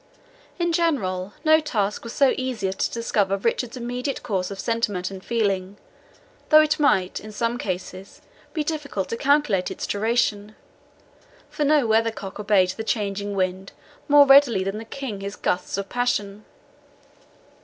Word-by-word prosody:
In 345 -1 0
general, 205 - 0
no 315 0 +6
task 210 -9 -2
was 230 - -7
so 275 -2 +4
easy 255 -6 -2
as 190 - -3
to - - 0
discover 205 -4 0
Richard's 235 +4 -2
immediate 250 +3 -4
course 185 -5 -2
of 200 -1 -7
sentiment 205 -6 -1
and 190 -1 -9
feeling, 200 -4 -1 0.7
though 310 0 +8
it 310 0 0
might, 190 -11 +2
in 215 - -10
some 230 +3 -2
cases, 185 -1 -6 0.3
be 310 - -2
difficult 295 - -3
to - - -2
calculate 250 -8 +2
its - - -5
duration; 215 -1 0 1.0
for 295 - -1
no 290 -2 +4
weathercock 220 -3 0
obeyed 200 -3 +3
the 220 +4 -6
changing 205 -2 -2
wind 185 0 -2 0.3
more 290 -1 +7
readily 270 -8 +6
than 195 +2 -3
the 225 - -8
King 225 -5 -6
his 200 +1 -5
gusts 180 +1 -2
of 200 0 -3
passion. 210 -4 -2
215 Hz, 155 wpm, -23 LUFS, 195-260 Hz, 1.0 s, though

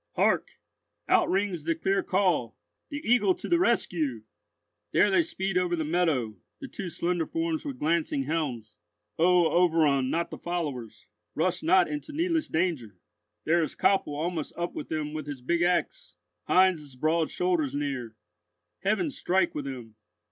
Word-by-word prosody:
Hark! - - +2 0.5
Out - - +3
rings 190 -4 0
the 165 +1 0
clear 195 +4 +1
call, 180 - 0 0.3
"The 290 -2 -6
Eagle 210 -6 +4
to - - -7
the 345 - +3
rescue!" 155 - 0 0.7
There 205 - +4
they 195 - +5
speed 195 - -1
over 180 -1 0
the 160 - -2
meadow, 150 - 0 0.2
the 275 - -7
two 195 -8 -6
slender 170 0 -1
forms 330 -1 -2
with 275 -3 -5
glancing 155 - 0
helms! 130 -9 -3 0.4
O 175 +1 +5
overrun 160 -7 +3
not 170 +3 -1
the - - -7
followers, 145 -10 -4 0.3
rush 175 +2 0
not 180 +2 +4
into 150 - -6
needless 330 0 0
danger! 160 - -1 0.5
There 170 +2 +3
is 155 - -3
Koppel 190 -7 +2
almost 160 0 -3
up 175 0 -3
with - - -6
them 155 -1 -3
with 155 -2 -5
his 140 -4 -7
big 170 +6 0
axe—Heinz's 180 - 0
broad 155 +4 +1
shoulders 175 -6 0
near. 135 -6 -3 0.6
Heaven 220 - 0
strike 185 -7 +1
with 145 - -4
them! 120 -5 -8
170 Hz, 155 wpm, -27 LUFS, 145-185 Hz, 0.7 s, they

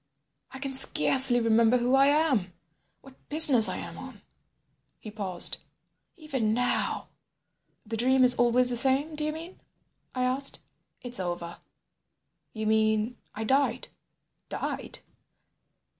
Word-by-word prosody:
I 265 - -10
can 270 0 -5
scarcely 265 -1 +3
remember 230 +1 +3
who 245 +1 0
I 270 +1 +5
am, 280 - +1 0.5
what 270 -1 -19
business 290 -7 +6
I - - -4
am - - -8
on... - - -12 0.4
." - - -47
He 215 - -10
paused. 195 -5 -3 0.5
"Even 265 -9 -2
now—" 245 +1 -2 0.8
"The 225 +1 -5
dream 260 +3 +3
is 250 -1 +5
always 245 +1 +2
the - - -1
same—do 280 +5 +1
you 305 - -1
mean?" 330 +4 -10 0.6
I 255 - -1
asked. 260 +2 -2 0.4
"It's 245 -2 -3
over." 175 -1 -5 0.9
"You 220 -1 -6
mean?" 220 +2 0 0.2
"I 220 - -4
died." 270 +5 0 0.6
"Died?" - - -5
250 Hz, 130 wpm, -27 LUFS, 220-270 Hz, 0.9 s, business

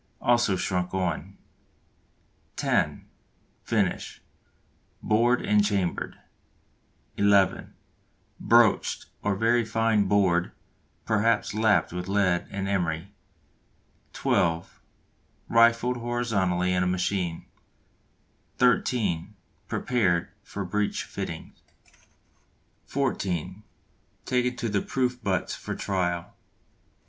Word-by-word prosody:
also 120 -5 +3
shrunk 90 0 -2
on. 95 +1 -2 1.2
(10) - - 0 0.6
Finish - - -1 0.8
bored 120 +3 +2
and 105 0 +4
chambered. 100 -4 -1 1.0
(11) 100 -1 +2 0.6
Broached, 115 -2 +3 0.2
or 105 -1 0
very 115 +4 +2
fine 110 -2 +1
bored, 95 -3 +2 0.5
perhaps 110 0 +1
lapped 105 -6 +2
with 90 0 -4
lead 95 -3 +1
and 95 -1 -4
emery. 90 -1 -2 1.0
(12) 85 0 0 0.7
Rifled 115 +2 +4
horizontally 100 -7 0
in 90 - +1
a 90 - +1
machine. 90 -1 -1 1.1
(13) 105 -6 +1 0.3
Prepared 95 -9 0
for 100 -1 -6
breech 105 +3 -1
fittings. - - -7 1.3
(14) 95 - -2 0.6
Taken 125 0 0
to 125 -2 -3
the 100 -2 0
Proof 125 -2 -1
Butts 95 -2 -1
for - - -5
trial. 90 -3 -2
100 Hz, 85 wpm, -26 LUFS, 90-115 Hz, 1.3 s, and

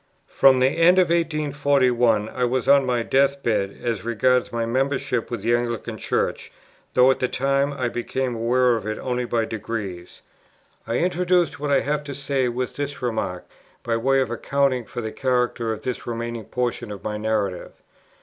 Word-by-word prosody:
From 135 -1 +4
the 130 - +4
end 165 +4 +4
of 185 -2 +4
1841, 140 -9 +2
I 125 - -3
was 125 0 0
on 140 -1 +5
my 120 -2 +1
death 140 +2 +2
bed, 100 -4 0
as 115 -5 -2
regards 125 +2 +1
my 115 -1 -1
membership 130 -1 -1
with 115 -5 -5
the 115 +1 +2
Anglican 120 -1 -2
Church, - - -2 0.4
though 125 +1 +6
at - - -2
the 125 - +1
time 140 +2 0
I 130 -3 -2
became 125 +2 -2
aware 120 +2 +2
of 110 -2 -5
it 110 - -3
only 125 -1 -2
by 115 -1 0
degrees. 105 -5 -6 0.6
I 115 +1 0
introduce 180 -2 +1
what 145 0 -3
I 140 -1 +3
have 150 +1 -1
to 140 -2 -6
say 135 -2 -1
with 125 +1 -4
this 145 -2 -4
remark, 110 -7 -2 0.4
by 115 - 0
way 135 +4 +2
of 125 -3 -2
accounting 130 0 0
for 120 +4 -6
the 110 -1 -4
character 125 -3 0
of 110 0 -5
this 125 0 -4
remaining 115 -1 -4
portion 120 -2 -3
of 100 - -8
my 105 0 -3
narrative. 105 -4 -2
125 Hz, 180 wpm, -23 LUFS, 115-140 Hz, 0.6 s, though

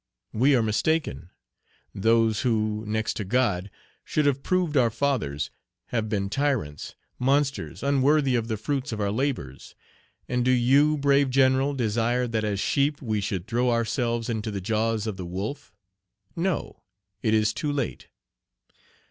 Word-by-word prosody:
We 135 +5 +4
are 120 - +3
mistaken; 110 - 0 0.6
those 115 +2 +2
who, 110 -4 0
next 110 +1 -1
to 105 - -2
God, 100 -3 0 0.3
should 150 - 0
have 140 -1 +2
proved 180 -3 0
our 125 -4 +4
fathers, 110 - -1 0.4
have 110 -2 -1
been 100 -2 -1
tyrants, 110 - -2 0.2
monsters 140 +2 0
unworthy 140 0 +3
of 115 -2 0
the 110 -2 -2
fruits 140 +5 -2
of 110 - -4
our 100 -1 0
labors; 110 - -3 0.5
and 125 0 0
do 130 - +1
you, 135 +5 +4
brave 140 -1 +3
general, 135 +1 +3
desire 120 +1 0
that 110 -2 -1
as 105 -2 -1
sheep 140 +6 +1
we 110 -5 -2
should 95 -2 -3
throw 120 +2 +1
ourselves 115 0 0
into 110 -2 -2
the 100 -2 -3
jaws 110 +2 0
of 105 -4 -4
the 90 - -5
wolf? 105 +11 -5 0.6
No! 175 0 -2 0.4
it 110 -1 +2
is 110 0 +2
too 150 +6 -2
late. 140 -4 -3
120 Hz, 150 wpm, -26 LUFS, 110-140 Hz, 0.6 s, We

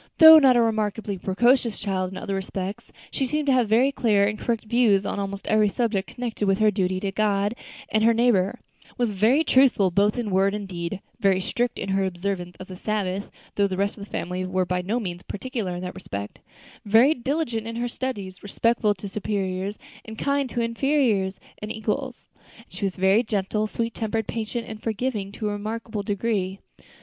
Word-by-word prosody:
Though 320 -1 +11
not 260 -4 +5
a - - +5
remarkably 215 -3 -1
precocious 235 +5 +2
child 190 -3 -2
in 185 - -8
other 200 0 -4
respects, 195 +1 -5 0.2
she 275 - -2
seemed 300 +3 -1
to 280 - +3
have 245 -4 +2
very 245 +5 +4
clear 210 -7 +2
and 210 +1 -2
correct 230 -2 -1
views 215 -4 +3
on - - -2
almost 200 0 -4
every 215 -1 +3
subject 210 -3 -1
connected 230 -4 -2
with 195 0 +3
her 215 0 +4
duty 185 -2 0
to 200 -1 -2
God 205 0 +1 0.3
and 215 0 +1
her 230 - +6
neighbor; 230 -2 +2 0.4
was 240 -3 +1
very 225 +10 +3
truthful 250 - +4
both 205 +5 +2
in 230 -4 -2
word 195 +2 +2
and 205 -1 -5
deed, 175 +1 -5 0.2
very 195 -2 +3
strict 240 +5 -1
in - - -4
her 195 0 +1
observance 180 -1 -3
of 185 - -7
the 185 - -9
Sabbath 200 -1 -2 0.2
though 200 -1 +2
the 185 -1 -4
rest 200 +1 0
of 200 - -9
the 200 - -11
family 180 +1 -3
were 185 0 0
by 180 0 -1
no 210 +7 -1
means 180 -5 -5
particular 205 -4 -4
in 175 - -5
that 180 - -5
respect 100 - -7 0.4
very 225 +8 +5
diligent 250 -4 -2
in 230 - -5
her 240 +1 -1
studies, 210 -7 -5
respectful 215 +1 +1
to 200 +2 -7
superiors, 195 -1 -3 0.3
and 220 0 -9
kind 280 0 0
to 240 - -2
inferiors 230 -5 +1 0.2
and 210 +1 -4
equals; 245 +4 -3 0.3
and 230 - -17
she 185 +2 -4
was 190 +3 +3
gentle, 210 +1 0
sweet 230 +1 -3
tempered, 220 0 -2
patient, 230 +2 -4
and 220 -1 -8
forgiving 220 -3 -2
to 210 0 -3
a - - -2
remarkable 215 +1 -4
degree. 200 -2 -1
210 Hz, 195 wpm, -24 LUFS, 195-230 Hz, 0.4 s, Though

